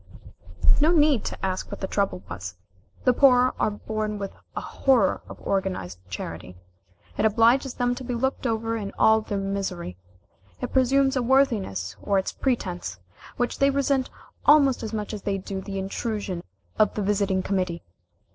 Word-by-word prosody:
No 305 +2 +4
need 295 -7 +4
to - - -4
ask 185 -1 -2
what - - -7
the - - -2
trouble 200 -2 -1
was. 90 -1 -7 0.5
The 250 - +4
poor 255 -1 +5
are - - +2
born 215 0 -3
with 200 -1 -4 0.2
a - - -1
horror 245 -9 +2
of - - -10
organized 185 - -2
charity. 90 0 -6 0.6
It - - +3
obliges 235 +5 +3
them 245 -1 +1
to 255 +1 -7
be 245 -1 -3
looked 265 +2 -1
over 225 0 -1
in 205 -3 -4
all 220 0 +5
their 205 -1 -3
misery; 195 - -3 0.6
it - - -5
presumes 270 +1 +3
a 255 - +2
worthiness, 225 - +1
or 200 - +1
its 190 - 0
pretence, 185 - -2 0.4
which 245 - -1
they 275 - +5
resent 275 -1 +1 0.3
almost 280 -3 +5
as 220 -2 -4
much 215 -1 -4
as 210 - -5
they 195 0 -1
do 190 0 -5
the 195 0 -6
intrusion 195 -1 -3 0.4
of 215 - +3
the 210 - -1
visiting 195 -2 +1
committee. 185 -4 -1
215 Hz, 165 wpm, -25 LUFS, 190-250 Hz, 0.6 s, poor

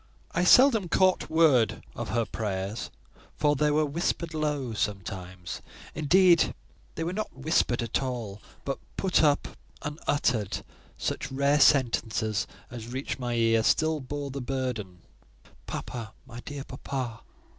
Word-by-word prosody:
I 175 - +1
seldom 225 -4 +6
caught 185 +1 +3
a - - -14
word 150 -9 +4
of - - -4
her 115 +3 +1
prayers, 100 -1 -3 0.5
for 145 0 +2
they 150 +2 +2
were 150 +1 +3
whispered 165 +2 -2
low: 145 -6 -1
sometimes, 95 -4 -4 0.3
indeed, 170 +2 +4 0.4
they 165 - -2
were 170 +2 -2
not 215 -7 -4
whispered 130 -4 +1
at 115 - -1
all, 115 -6 -4 0.2
but 135 - -2 0.2
put 190 -2 +3
up 145 -2 +3 0.3
unuttered; 145 - -1 0.3
such 135 - -3
rare 140 +2 +2
sentences 110 -6 +3 0.2
as 115 -2 -7
reached 130 +3 -4
my 120 -2 -2
ear 115 -1 +3
still 155 +7 +2
bore 140 +1 -5
the 135 +1 -4
burden, 120 -9 -3 0.6
"Papa; 115 -3 -5
my 120 -2 -9
dear 140 +2 -6
papa!" 130 -4 -5
135 Hz, 135 wpm, -28 LUFS, 115-150 Hz, 0.6 s, seldom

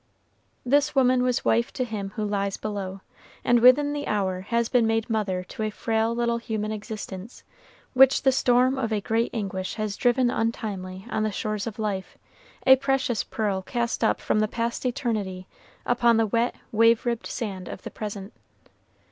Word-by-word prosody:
This 290 +3 +2
woman 255 -1 +4
was 250 -1 0
wife 235 +1 +2
to 255 - -1
him 210 -4 -5
who 215 -2 -2
lies 200 -1 -1
below, 195 -2 -5 0.4
and 240 0 +4
within 270 +5 +6
the 290 0 -4
hour 190 -3 -1
has 235 +4 0
been 235 -2 +3
made 225 0 0
mother 195 -4 -1
to - - -7
a 215 - 0
frail 225 +2 -1
little 235 0 0
human 215 -2 -3
existence, 210 -1 -7 0.5
which 265 +1 +6
the 265 - +5
storm 255 +1 +3
of 230 -3 -2
a 215 - +1
great 225 +3 0
anguish 190 -4 -4
has 215 -2 -3
driven 245 0 +2
untimely 195 -4 -3
on 220 - 0
the 215 0 0
shores 215 +1 -3
of 220 - -6
life, 205 -4 -3 0.5
a 265 0 +8
precious 265 -4 0
pearl 205 -4 -2
cast 235 +4 -2
up 220 - +2
from - - 0
the 215 - +2
past 235 +3 -2
eternity 210 -7 -2 0.4
upon 240 -1 +3
the 225 - +3
wet, 230 +3 0 0.2
wave 230 +1 +4
ribbed 235 -1 -2
sand 195 -5 -5
of - - -8
the - - -7
present. 205 -1 -6
225 Hz, 175 wpm, -25 LUFS, 205-240 Hz, 0.5 s, a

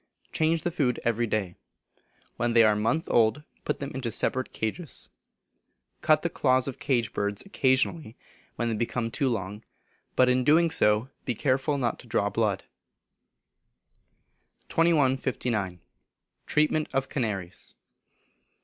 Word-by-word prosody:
Change 160 0 +1
the 175 - -1
food 130 -7 0
every 120 0 +1
day. 100 -5 -1 0.8
When 120 0 0
they 115 -1 +7
are 110 - +5
a - - -2
month 115 +10 0
old, 115 +5 +2 0.2
put - - -1
them 140 0 -5
into 125 -3 -3
separate 130 +3 -1
cages. 130 +9 -3 0.9
Cut 155 -1 +3
the 170 - 0
claws 130 -1 +2
of 135 - -5
cage 125 -6 0
birds 100 0 -2
occasionally, 130 - +1 0.4
when 120 - -1
they 115 - -1
become 115 +1 -2
too 135 +2 0
long, 105 -1 -4 0.5
but 130 - +5
in 125 0 +3
doing 160 +4 +4
so 105 +1 +3
be 125 - -2
careful 135 +4 +1
not 125 -3 -1
to 125 - -14
draw 100 -2 0
blood. 105 -4 0 2.1
2159. 130 - +1 0.7
Treatment 155 0 +2
of 135 0 0
Canaries. 100 -9 -4
125 Hz, 135 wpm, -27 LUFS, 110-145 Hz, 2.1 s, they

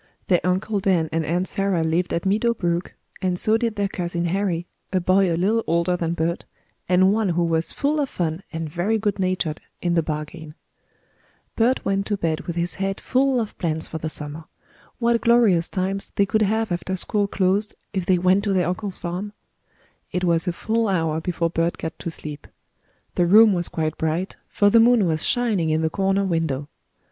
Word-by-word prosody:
Their 180 -2 +4
Uncle 190 +3 0
Dan 180 -5 +1
and 165 0 0
Aunt 175 +4 -1
Sarah 195 -4 0
lived 165 +3 0
at 170 - -2
Meadow 220 +4 +2
Brook, 175 -2 -2 0.3
and 185 -1 0
so 215 +4 +2
did 225 -1 0
their 200 -1 0
cousin 175 -2 -3
Harry, 175 -1 -1 0.3
a 185 - +2
boy 185 +1 +3
a 165 - 0
little 215 +6 +1
older 170 +2 +1
than 170 -1 -2
Bert, 170 +1 -1 0.4
and 185 +2 +5
one 215 -2 +1
who 175 0 +1
was 165 -1 0
full 295 +2 0
of 275 - -1
fun 165 0 -2
and 165 -1 -4
very 175 +8 0
good 205 -2 -1
natured 185 -4 -1 0.2
in 175 -1 0
the 170 - +3
bargain. 155 0 -6 1.0
Bert 240 +3 +1
went 195 0 0
to 205 - -1
bed 160 -4 -2
with 170 - -3
his 175 0 +1
head 195 0 -1
full 260 0 +1
of 220 -3 -4
plans 160 -2 -1
for 160 - -5
the 160 - -3
summer. 150 +1 -6 0.5
What 235 -1 +2
glorious 225 -8 +4
times 195 +1 -3
they 200 - +3
could 215 +2 0
have 220 0 +1
after 175 +2 -2
school 205 +2 0
closed 200 +2 0 0.2
if 190 -3 -2
they 185 - +4
went 185 +3 +3
to 200 - +1
their 180 -3 +2
uncle's 195 +1 -4
farm! 185 +4 -5 0.8
It 180 - -2
was 170 -1 +2
a - - +2
full 225 +6 -1
hour 165 -4 0
before 170 -1 -1
Bert 165 0 0
got 160 - -6
to - - -4
sleep. 150 -2 -8 0.7
The 175 - +2
room 215 +3 +7
was 175 -2 -1
quite 155 -1 -3
bright, 160 +4 -1
for 205 0 +3
the 230 - +6
moon 235 -2 +5
was 160 -2 0
shining 215 -9 +1
in 155 +1 +1
the 160 - 0
corner 195 +1 +1
window. 160 -5 -1
180 Hz, 200 wpm, -23 LUFS, 165-205 Hz, 1.0 s, room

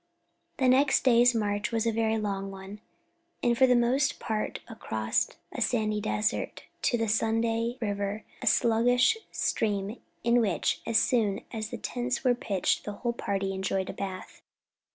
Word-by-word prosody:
The 260 - +2
next 270 +2 +4
day's 245 -1 +5
march 205 -1 -1
was 225 -1 0
a 230 - +2
very 225 0 +1
long 195 -2 -3
one, 195 +2 -9 0.6
and 240 -1 +3
for 260 +2 +5
the 250 - +4
most 250 +3 +2
part 215 -1 -3
across 110 - -1 0.2
a - - -6
sandy 215 -3 +1
desert, 215 0 -1 0.2
to 240 - +2
the 225 -1 -1
Sunday 225 +2 0
River, 205 -1 -2 0.2
a 255 - -4
sluggish 245 - +4 0.2
stream 205 +1 -1 0.2
in 235 +1 +4
which, 200 -6 0
as 230 - +3
soon 215 -4 +2
as 220 -1 -4
the - - -5
tents 245 0 -3
were 250 -2 +4
pitched, 200 -6 -1
the 210 - -5
whole 235 +3 -2
party 195 -4 -2
enjoyed 190 0 -2
a - - -11
bath. 190 -2 -7
225 Hz, 160 wpm, -28 LUFS, 205-240 Hz, 0.6 s, day's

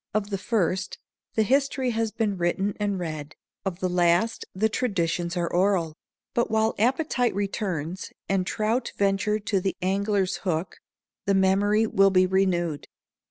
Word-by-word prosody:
Of 210 -1 -1
the 195 - -1
first, 190 -3 -1 0.4
the 220 - +4
history 265 +1 +1
has 225 -1 -1
been 215 -3 -1
written 190 +3 0
and 205 -2 0
read. 155 -4 -5 0.3
Of 190 -2 -4
the 185 - +1
last, 180 +5 +2
the 215 +4 +2
traditions 175 -7 -1
are 170 -1 0
oral; 175 -3 +2 0.4
but 235 - +1
while 220 0 +2
appetite 250 -1 +1
returns, 190 -4 -3 0.2
and 190 -1 0
trout 225 +4 -1
venture 200 +1 +1
to 205 -1 -1
the 190 - -1
angler's 195 +1 0
hook, 175 -2 -2 0.5
the 200 - +3
memory 200 +3 +3
will 195 -2 +4
be 185 -1 +4
renewed. 180 -5 0
195 Hz, 150 wpm, -26 LUFS, 180-215 Hz, 0.5 s, the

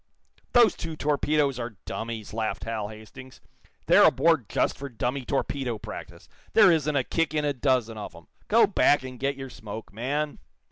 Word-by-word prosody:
"Those 240 -2 +6
two 165 -1 -6
torpedoes 145 -2 +1
are 120 -3 -6
dummies," 115 -2 -5
laughed 110 -2 -2
Hal 110 -2 -3
Hastings. 110 +5 -12 0.5
"They're - - +6
aboard - - +2
just - - +1
for 140 +2 -7
dummy 125 +2 -2
torpedo 135 -3 -2
practice. 105 - -9 0.3
There 210 -4 +7
isn't 150 -2 +1
a 135 - +2
kick 160 +2 -1
in 150 -1 +1
a 145 - +1
dozen 125 -4 0
of 105 - -8
'em. - - -14 0.2
Go - - +5
back 145 - +3
and 130 -1 -8
get 140 +1 -1
your 135 -1 -8
smoke, 110 -1 -9
man!" 145 +7 -2
130 Hz, 175 wpm, -26 LUFS, 115-145 Hz, 0.5 s, There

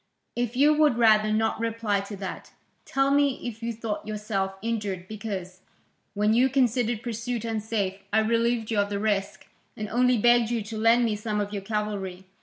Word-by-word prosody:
"If 240 0 -2
you 290 +4 +5
would 300 -5 +3
rather 215 -2 +4
not 220 +1 +1
reply 225 -3 0
to 200 +1 -6
that, 190 -1 -7 0.3
tell 270 0 +1
me 280 -1 +2
if 225 -1 -7
you 230 0 -2
thought 220 -2 -5
yourself 210 -2 -2
injured 205 -5 -3
because, 190 -4 -6 0.5
when 210 +1 +2
you 250 +3 +4
considered 240 -3 +1
pursuit 235 0 -3
unsafe, 215 -3 -2
I 220 - +4
relieved 230 0 +1
you 215 - +1
of 200 0 +1
the 205 - -2
risk, 200 -1 -1 0.3
and 215 - -4
only 250 +1 +3
begged 240 +1 +4
you 235 -3 -1
to 215 +1 -7
lend 230 +2 +4
me 220 -2 0
some 210 0 -2
of 205 0 -3
your 200 - -3
cavalry? 195 -3 -3
220 Hz, 185 wpm, -26 LUFS, 205-235 Hz, 0.5 s, you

